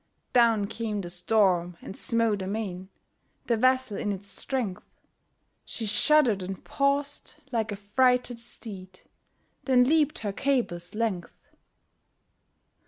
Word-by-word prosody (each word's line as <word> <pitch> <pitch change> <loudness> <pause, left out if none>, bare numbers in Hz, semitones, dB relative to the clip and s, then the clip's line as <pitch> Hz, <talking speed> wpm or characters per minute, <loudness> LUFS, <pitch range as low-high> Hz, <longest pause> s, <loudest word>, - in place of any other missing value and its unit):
Down 230 -4 +4
came 215 -1 -3
the 175 -2 -7
storm, 180 -2 +2
and - - -9
smote 230 -3 +1
amain 190 -2 -4 0.6
The 235 - +2
vessel 255 -1 +2
in 210 - -1
its 200 0 -5
strength; 225 -5 -3 0.8
She 225 - -6
shudder'd 220 0 +3
and 185 0 -6
paused, 280 +1 -1 0.2
like 225 -2 -1
a - - -2
frighted 245 +4 +1
steed, 190 -6 -8 0.6
Then 255 -2 +5
leap'd 305 +2 +2
her 200 - -1
cable's 205 -9 -1
length. 215 -6 -3
220 Hz, 115 wpm, -27 LUFS, 195-250 Hz, 0.8 s, Then